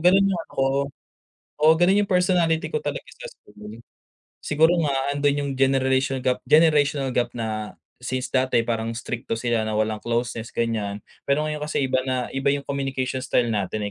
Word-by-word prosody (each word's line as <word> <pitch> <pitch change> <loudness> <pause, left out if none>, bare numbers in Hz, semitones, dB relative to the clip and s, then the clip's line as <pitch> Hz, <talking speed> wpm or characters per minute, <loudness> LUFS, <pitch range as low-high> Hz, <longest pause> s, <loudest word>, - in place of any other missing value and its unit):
ganun 185 +4 +5
yung 190 -3 0
ano - - -20
ko 135 - +2 0.9
oo, 155 +1 +6
ganun 190 +4 +4
yung 200 - -14
personality 180 -3 +2
ko 460 -1 -3
talaga - - -3
sa - - -9
school. 105 +1 -13 0.6
Siguro 160 +3 +3
nga 140 -2 0
andun 145 0 +1
yung - - -3
generation 130 0 +2
gap 125 0 -1
generational 145 -2 +3
gap 120 -1 +1
na, 110 -2 -4 0.3
since 130 0 -2
dati, 130 -2 +2
parang 115 -1 -1
strikto 120 0 -4
sila 115 -1 0
na 110 0 -2
walang 110 0 0
closeness 120 -1 -2
ganyan, 110 -3 -2 0.2
pero 140 +2 +1
ngayon 150 -1 -4
kasi 150 -2 -1
iba 130 0 +1
na, 130 -1 -1
iba 135 +1 +1
yung 140 0 -2
communication 135 -2 -2
style 125 -2 +1
natin 105 0 -2
130 Hz, 175 wpm, -23 LUFS, 115-150 Hz, 0.9 s, oo